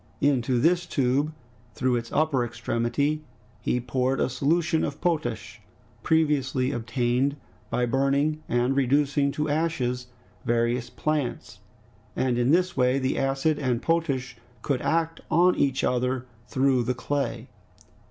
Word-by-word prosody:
Into 130 -3 +2
this 175 +5 +2
tube, 140 +3 +1 0.4
through 130 -1 +1
its 115 -1 -4
upper 150 -5 +2
extremity, 120 +6 -1 0.4
he 125 - 0
poured 130 +2 -1
a 125 - +1
solution 160 +4 +1
of 145 +1 -3
potash, 120 -10 -2 0.4
previously 140 -3 +1
obtained 125 +3 0 0.3
by 125 - +1
burning 140 +4 +1
and 120 +2 +1
reducing 140 +1 +2
to 150 +1 -1
ashes 145 -6 -1 0.4
various 120 +1 0
plants, 145 -8 -3 0.6
and 125 -2 +1
in 120 +1 +2
this 180 +3 +2
way 125 0 +3
the 130 -1 0
acid 135 +3 +1
and 125 -3 0
potash 135 -6 -1 0.3
could 135 -4 0
act 165 0 0
on 175 +3 +4
each 135 -2 +1
other 125 0 0 0.2
through 130 -1 +2
the 125 +2 -1
clay. 140 +3 -2
135 Hz, 130 wpm, -26 LUFS, 125-150 Hz, 0.6 s, on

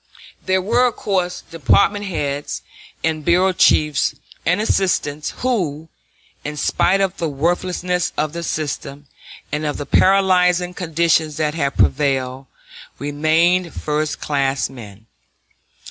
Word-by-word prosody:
There 185 0 +1
were 240 +5 +3
of 240 - -3
course 185 -3 -1
department 200 +6 +1
heads 145 -6 -3 0.4
and 160 -1 -1
bureau 180 +3 +3
chiefs 150 -5 +3 0.3
and 180 +3 +3
assistants 165 -8 0
who, 165 - -1 0.5
in 150 +1 -5
spite 190 +7 +2
of 195 0 0
the 165 - -2
worthlessness 175 +4 -1
of 155 0 -1
the 170 - -4
system, 145 -3 -4 0.5
and 150 +1 -2
of 150 -1 -2
the 145 - -5
paralyzing 180 -1 +3
conditions 165 -3 +1
that 150 -1 0
had 140 -4 -2
prevailed, 135 -2 +1 0.5
remained 160 +5 +1
first 150 0 -2
class 135 -2 -1
men. 110 -4 -12
160 Hz, 120 wpm, -20 LUFS, 145-180 Hz, 0.5 s, were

